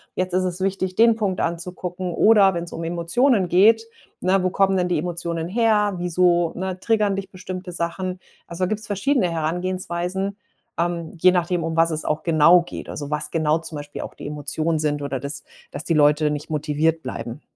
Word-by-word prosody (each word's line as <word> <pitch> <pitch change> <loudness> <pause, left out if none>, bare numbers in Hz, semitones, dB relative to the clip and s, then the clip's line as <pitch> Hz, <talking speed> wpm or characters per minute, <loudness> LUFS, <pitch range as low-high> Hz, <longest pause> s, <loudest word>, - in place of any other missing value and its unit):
jetzt 185 0 -2
ist 185 0 +2
es 180 0 -3
wichtig, 190 -1 -1
den 230 +1 +5
Punkt 200 -4 -1
anzugucken.“ 180 +1 -3
Oder 200 -4 +5
wenn's 170 0 -5
um 165 - -5
Emotionen 175 +6 +1
geht, 220 +6 +5 0.4
ne, 190 +1 +2
wo 185 - +1
kommen 195 +1 +2
denn 180 -1 +1
die 180 - 0
Emotionen 170 0 -3
her? 210 0 +2
Wieso, 175 -1 +2
ne, 185 0 -4
triggern 210 -1 +1
dich 195 0 -5
bestimmte 185 0 -7
Sachen? 175 +2 -3 0.3
Also, 170 +2 -4
da 185 - +2
gibt's 215 0 -3
verschiedene 205 +1 +1
Herangehensweisen, 180 +3 -2 0.4
ähm, 170 -1 -2
je 185 - +7
nachdem, 175 -1 0
um 165 0 -3
was 165 0 +4
es 155 0 -3
auch 155 - -1
genau 170 +1 +5
geht. - - -8
Also, 145 0 -6
was 150 0 0
genau 155 -1 +1
zum 165 -1 -4
Beispiel 145 0 -7
auch - - -8
die - - -10
Emotionen 155 +2 -2
sind 145 -1 -1
oder 140 -2 -3
dass 140 +2 -4 0.3
dass 145 - -5
die 165 - 0
Leute 150 0 +4
nicht 150 +1 -5
motiviert 155 +1 0
bleiben. 130 +1 -6
175 Hz, 190 wpm, -22 LUFS, 160-190 Hz, 0.4 s, je